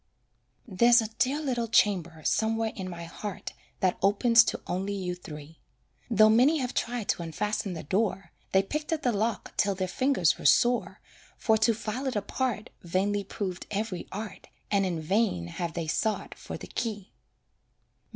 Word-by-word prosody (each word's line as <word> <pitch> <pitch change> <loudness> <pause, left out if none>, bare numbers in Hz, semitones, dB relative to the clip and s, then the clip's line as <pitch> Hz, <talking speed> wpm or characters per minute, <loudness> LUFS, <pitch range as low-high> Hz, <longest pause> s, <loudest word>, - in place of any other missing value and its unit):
There's 235 +4 +5
a 220 -2 -1
dear 275 +4 +2
little 250 -6 -1
chamber 175 -8 +2
somewhere 225 +1 +1
in 185 -2 -5
my 170 -1 -7
heart 190 +4 -6 0.3
That 185 -1 +1
opens 230 +4 +5
to - - -2
only 195 +3 -2
you 180 -2 -3
three; 155 -3 -10 0.5
Though 215 -2 +6
many 250 +9 +5
have 250 -4 -2
tried 240 -3 -2
to - - +1
unfasten 195 +4 -2
the 165 - -6
door, 195 +3 -1 0.2
They 190 0 +4
picked 300 +10 -4
at 315 -2 -1
the 245 - +3
lock 220 +1 -2
till 200 -1 +2
their 185 0 -2
fingers 255 - +2
were - - -9
sore, 240 - +3 0.4
For 220 - +3
to 225 +1 +3
file 230 +5 -4
it 260 - -2
apart 215 +2 -2
Vainly 195 +4 0
proved 190 -2 -5
every 205 -3 -3
art, 210 +2 -7 0.2
And 200 -2 +3
in 170 -3 -2
vain 190 - +1
have 165 - -4
they 170 -2 -3
sought 210 +7 -1
for - - -8
the - - -9
key. 210 -4 -4
205 Hz, 170 wpm, -28 LUFS, 185-230 Hz, 0.5 s, Though